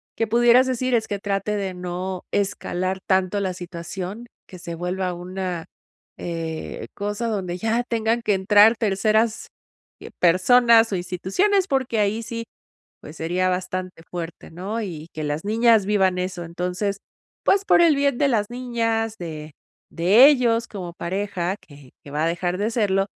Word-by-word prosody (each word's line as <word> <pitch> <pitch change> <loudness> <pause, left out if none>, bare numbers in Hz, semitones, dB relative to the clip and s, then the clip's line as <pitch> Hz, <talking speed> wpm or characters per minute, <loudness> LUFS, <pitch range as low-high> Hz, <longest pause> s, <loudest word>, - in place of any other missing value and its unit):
que 225 - 0
pudieras 240 +3 +5
decir 255 0 -1
es 225 -2 +2
que 205 - -2
trate 200 +1 -2
de 195 -2 -3
no 180 +1 -4
escalar 190 -2 -1
tanto 190 +1 +2
la 190 -2 -1
situación 180 +5 -7 0.2
que 180 - -11
se 170 0 -6
vuelva 180 +2 -2
una, 180 -1 -5 0.5
eh, 165 -2 -5
cosa 205 +3 -3
donde 185 -4 -3
ya 225 +4 0
tengan 230 0 0
que 210 -3 +1
entrar 205 +4 +6
terceras 215 +1 +1 0.7
personas 225 +6 +5
o - - 0
instituciones, 195 - 0
porque 260 -5 0
ahí 210 +2 +1
sí, 230 0 -5 0.6
pues, 150 - -11
sería 180 +3 0
bastante 185 -1 -3
fuerte, 170 -2 -7
¿no?, 195 +7 -4
y 165 -5 -7
que 155 -1 -5
las 150 +4 -3
niñas 225 -1 +4
vivan 190 -3 +2
eso. 180 -1 -3
Entonces, 180 +4 -3 0.5
pues, 395 0 +3
por 380 - +5
el 320 -4 +5
bien 280 -2 +1
de 285 - +3
las 210 -5 +1
niñas, 230 -3 -1
de 155 -3 -7 0.4
de 195 +10 +6
ellos 235 -5 +2
como 180 -4 -7
pareja, 190 0 -2
que 145 -3 -16
que 140 - -12
va 150 +2 -1
a - - +2
dejar 175 +1 -1
de 215 +3 0
serlo, 195 -4 +1
195 Hz, 160 wpm, -23 LUFS, 180-225 Hz, 0.7 s, entrar